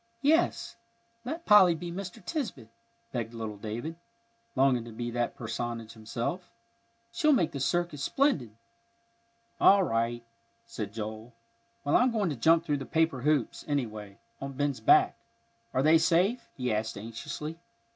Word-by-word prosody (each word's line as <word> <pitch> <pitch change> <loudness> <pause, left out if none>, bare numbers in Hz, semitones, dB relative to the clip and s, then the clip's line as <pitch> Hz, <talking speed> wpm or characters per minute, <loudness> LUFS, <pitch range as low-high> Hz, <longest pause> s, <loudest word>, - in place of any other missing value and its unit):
"Yes, 320 +4 +2 0.5
let 320 +7 -5
Polly 190 -5 +7
be 170 +2 -6
Mr. 185 0 -7
Tisbett," 230 - -4 0.4
begged 115 -2 -4
little 110 -2 -5
David, 120 +10 -5 0.6
longing 130 -3 +3
to 120 - -9
be 120 +2 -4
that 120 0 -1
personage 115 0 -4
himself. 120 +11 -4 0.6
"She'll 305 +7 +3
make 175 - +2
the 140 - -5
circus 170 +1 0
splendid." 150 - +1 1.0
"All 195 0 +6
right," 115 -4 -1 0.4
said 110 -3 -5
Joel. 110 +2 -7 0.5
"Well, 145 - +1
I'm 250 - +5
going 210 -7 0
to - - -3
jump 165 +7 +4
through 145 -3 0
the 135 - -6
paper 160 -5 +1
hoops, 145 -2 0
anyway, 110 -8 -3 0.2
on 135 0 -5
Ben's 140 -2 -1
back. 110 - +4 0.5
Are 130 - +1
they 160 +2 +6
safe?" 185 +9 +2
he 125 -4 -1
asked 110 +1 -2
anxiously. 115 +9 -6
135 Hz, 145 wpm, -29 LUFS, 115-175 Hz, 1.0 s, Polly